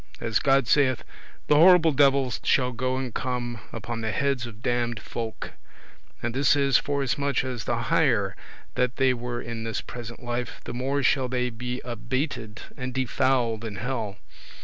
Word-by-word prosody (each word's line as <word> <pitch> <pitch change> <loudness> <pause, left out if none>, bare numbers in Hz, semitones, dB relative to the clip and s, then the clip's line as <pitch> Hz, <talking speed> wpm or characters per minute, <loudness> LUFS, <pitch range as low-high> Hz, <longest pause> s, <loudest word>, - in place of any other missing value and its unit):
As 115 -1 +1
God 135 -2 +3
saith, 130 -3 +3 0.4
"The 150 - +4
horrible 170 0 +7
devils 135 -3 +3
shall 125 -1 +3
go 130 +1 -1
and 130 -3 -4
come 120 -2 -3
upon 115 +1 -5
the 110 -1 -1
heads 135 -1 0
of 115 -1 -12
damned 120 -1 0
folk;" 115 0 -5 0.7
and 120 0 -1
this 135 +2 +4
is, 140 -1 +4
forasmuch 140 -1 0
as 125 -3 -4
the 120 - 0
higher 120 - +2 0.4
that 125 -1 0
they 130 -1 +3
were 120 0 -4
in 115 -1 -5
this 115 -1 -2
present 120 0 -8
life, 120 0 -3
the - - -6
more 135 +3 -1
shall 130 -1 +2
they 125 0 0
be 125 +2 -5
abated 120 -2 -3
[abased] - - -15
and 130 0 -4
defouled 130 -3 +1
in 110 -3 -5
hell. 110 -2 -3
125 Hz, 170 wpm, -26 LUFS, 115-135 Hz, 0.7 s, horrible